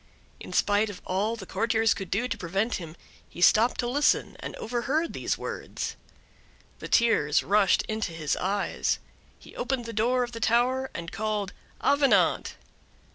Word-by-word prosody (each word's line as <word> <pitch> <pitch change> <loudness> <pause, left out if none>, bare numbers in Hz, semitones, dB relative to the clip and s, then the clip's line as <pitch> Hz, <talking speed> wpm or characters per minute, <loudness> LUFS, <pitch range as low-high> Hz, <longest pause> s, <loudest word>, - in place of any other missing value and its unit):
In - - -9
spite 205 +1 +2
of 200 - -8
all 205 +5 0
the 210 -4 -9
courtiers 225 +3 +1
could 195 - -7
do 230 +6 0
to - - -2
prevent 195 +5 -1
him, 165 -3 -9 0.3
he - - -12
stopped 220 +6 +4
to 240 - -2
listen, 285 +4 +2
and - - -6
overheard 260 +8 -1
these - - -2
words. - - -5 0.8
The - - -6
tears 225 -11 +3
rushed 200 -1 +3
into 215 -4 -3
his 160 -3 -1
eyes; 200 +2 -1 0.4
he - - -16
opened 245 -1 -2
the 230 - -6
door 245 +4 +2
of 240 - -5
the 230 - -7
tower, 250 +4 +2
and 170 0 -5
called: 210 -2 -2 0.3
"Avenant!" 285 -1 +3
220 Hz, 160 wpm, -27 LUFS, 195-240 Hz, 0.8 s, stopped